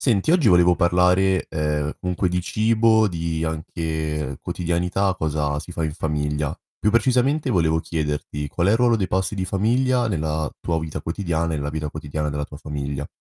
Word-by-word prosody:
Senti, 120 +3 +2
oggi 165 -9 +4
volevo 90 -1 +5
parlare, 90 +2 +3
ehm, 75 -1 -1
comunque 90 +1 0
di 90 +1 0
cibo, 110 +3 +3
di, 85 -3 -2
anche, 80 -3 -3
quotidianità, 90 +3 0
cosa 75 -3 -1
si 90 - -10
fa 85 -1 -2
in 75 - -2
famiglia. 75 -1 -2 0.2
Più 105 - +1
precisamente 130 +5 +2
volevo 80 -6 +2
chiederti 75 -2 -3
qual 85 +4 -1
è - - +5
il - - +4
ruolo 120 -1 +3
dei 100 -4 0
pasti 95 +3 -1
di 95 - -1
famiglia, 120 +5 +1
nella 80 -5 -1
tua 85 -1 -1
vita 80 -1 -5
quotidiana 85 0 -2
e - - 0
nella 75 0 -3
vita 75 0 -3
quotidiana 75 0 -4
della 75 0 -2
tua 75 - -10
famiglia? 70 -2 -4
85 Hz, 175 wpm, -23 LUFS, 75-95 Hz, 0.2 s, volevo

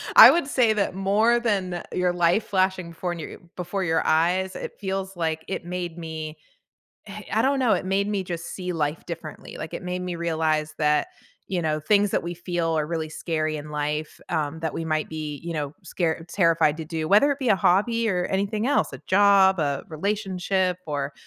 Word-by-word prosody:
I - - +12
would 340 -5 +1
say 250 -6 +3
that 200 -3 0
more 210 +5 +3
than 190 -7 -1
your 180 -1 +1
life 175 +5 +2
flashing 185 -3 0
before 175 +1 -3
new 165 -3 -6
eh, - - -21
before 180 +2 -2
your 160 -1 +2
eyes, 180 +4 +2
it - - -7
feels 190 -1 -3
like, 160 -1 -1
it 185 - -4
made 175 -1 -4
me 160 -2 -6 0.7
eh, 205 +1 -8
I 220 - +2
don't 270 +2 +2
know, 240 -4 +3
it 185 - +1
made 200 +2 +1
me 200 -3 -1
just 170 -1 -5
see 180 -1 -4
life 150 0 -2
differently, 165 -2 -8
like, - - -6
it - - -6
made 180 0 -3
me 180 -1 -4
realize 160 -2 0
that, 150 -1 +2 0.4
you 180 -2 -2
know, 155 -1 0
things 200 +5 +3
that - - 0
we 175 0 -4
feel 170 -2 -1
are 150 -1 0
really 160 -1 -3
scary 155 -1 -2
in 150 0 -8
life, 150 +1 -3
um, 160 -1 -1
that 160 -1 -3
we 165 - -3
might 155 -1 -1
be, 155 -2 -5
you 170 - -3
know, 145 -2 -3
scare 165 -1 -2
terrified 165 -4 +3
to 160 - -4
do, 160 -1 -3
whether 210 - +5
it 280 - -1
be 260 -3 -1
a 200 - +5
hobby, 225 +6 +2
or 180 -2 0
anything 200 +4 -1
else, 285 - +1
a - - -8
job, 195 -2 +5
a 140 -2 -1
relationship, 185 +1 -1
or, 140 -1 -2
175 Hz, 205 wpm, -25 LUFS, 160-195 Hz, 0.7 s, I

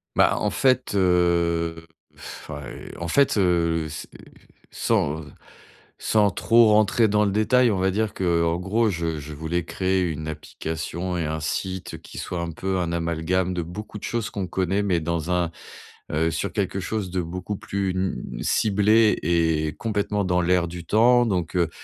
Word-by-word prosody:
Ben, - - +5
en - - 0
fait, 130 -5 +1
heu, 85 -2 +2 0.3
enfin, 75 -2 -9
heu, - - -9
en 85 - -4
fait, 140 +3 +3
heu, 85 -4 +2
c'est 75 - -7 0.6
sans 75 +3 0
sans - - -20 0.6
sans 105 -3 +2
trop 115 +4 +4
rentrer 110 +2 +4
dans 105 0 +2
le 100 - +1
détail, 120 +4 +3
on 100 - 0
va 95 +1 +1
dire, 110 +1 -1
qu'en 85 -2 +1
gros 105 +5 +1
je 85 -4 -2
je 75 +1 -8
voulais 80 +3 -2
créer 95 +1 0
une 80 0 -5
application 80 +3 -4
et 80 - -1
un 80 +1 -2
site 95 +5 -4
qui - - -12
soit 85 -1 -4
un 85 - -3
peu 95 +2 -2
un 85 -1 -1
amalgame 85 +2 0
de 90 - -1
beaucoup 105 +5 -7
de - - -19
choses 115 -2 -2
qu'on 95 -3 -3
connaît 95 +2 0
mais 95 -4 +1
dans 85 +1 -2
un, 90 -1 +1 0.6
heu 80 +2 +1
sur 95 +2 -2
quelque 100 -1 -2
chose 100 0 -3
de 90 -1 0
beaucoup 90 +4 -5
plus, 100 -2 -2
hem, 95 0 -2 0.2
ciblé 105 +1 +3
et 80 -2 +1
complètement 105 -2 -1
dans 90 -1 +2
l'air 90 0 +2
du 85 0 -7
temps. 120 +5 +4
Donc 90 -4 -1
heu 85 -2 +2
90 Hz, 175 wpm, -24 LUFS, 85-105 Hz, 0.6 s, Ben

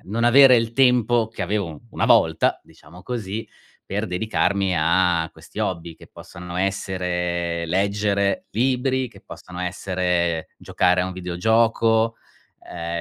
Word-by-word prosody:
non 115 +3 0
avere 130 +1 +7
il 115 0 0
tempo 120 -3 +3
che 110 -3 -6
avevo 95 -5 -3
una - - -1
volta, - - +3
diciamo 85 +5 -16
così, 110 -2 -5 0.4
per 105 +3 -3
dedicarmi 95 0 0
a 85 +1 +2
questi - - -14
hobby, 85 0 -3
che - - -16
possano 90 -1 -10
essere 90 -3 -2
leggere 100 +2 0
libri, 130 +3 0
che - - -17
possano 90 0 -10
essere 90 -2 -1
giocare 90 0 +1
a 90 - -2
un 95 - -5
videogioco, 110 +5 +1 0.5
uhm, 85 0 -4
95 Hz, 130 wpm, -22 LUFS, 90-115 Hz, 0.5 s, avere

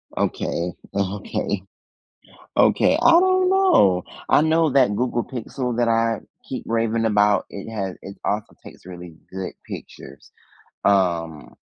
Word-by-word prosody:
Okay, 85 +1 -2 0.2
okay, 100 0 -2 1.0
okay, - - +4
I - - +6
don't 370 +2 +4
know. 365 - +4 0.2
I - - +5
know 160 0 +3
that 130 -6 +3
Google 120 +1 -1
Pixel 125 0 -4
that 120 -1 +2
I 115 -1 +1 0.3
keep - - -4
raving 115 0 0
about, 105 -1 +3
it 100 - -8
has, 95 -4 -4
it 100 +1 -9
also 105 +1 -2
takes - - -14
really 90 -2 -10 0.2
good 95 -1 -5
pictures. 70 - -10 0.5
Um, 85 -6 0
105 Hz, 130 wpm, -22 LUFS, 95-125 Hz, 1.0 s, I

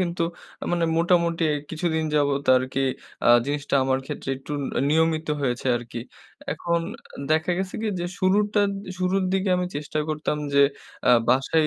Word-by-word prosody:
কিন্তু 175 -1 -1 0.4
আ - - -2
মানে 170 -1 +2
মোটামুটি 170 -1 +2 0.3
কিছুদিন 160 -1 -1
যাবত 140 -1 +2
আরকি 130 +1 -1 0.4
আ - - +3 0.2
জিনিসটা 145 0 -2
আমার 130 0 +2
ক্ষেত্রে - - -6
একটু 135 +3 -8
ন - - -2 0.3
নিয়মিত 160 0 +2 0.2
হয়েছে 125 -1 -1
আরকি। 120 0 -7 0.5
এখন 170 -1 -1 0.5
দেখা 160 +2 +2
গেছে 190 -1 -3
কি 225 - 0
যে, - - -2
শুরুরটার 205 +2 +3 0.3
শুরুর 185 +1 +1
দিকে 195 +1 +1
আমি 180 0 -1
চেষ্টা 150 +1 -4
করতাম 155 -1 -1 0.2
যে, 140 - +7 0.5
আ - - +8 0.2
বাসায় 135 +5 +3
160 Hz, 155 wpm, -24 LUFS, 140-180 Hz, 0.5 s, আ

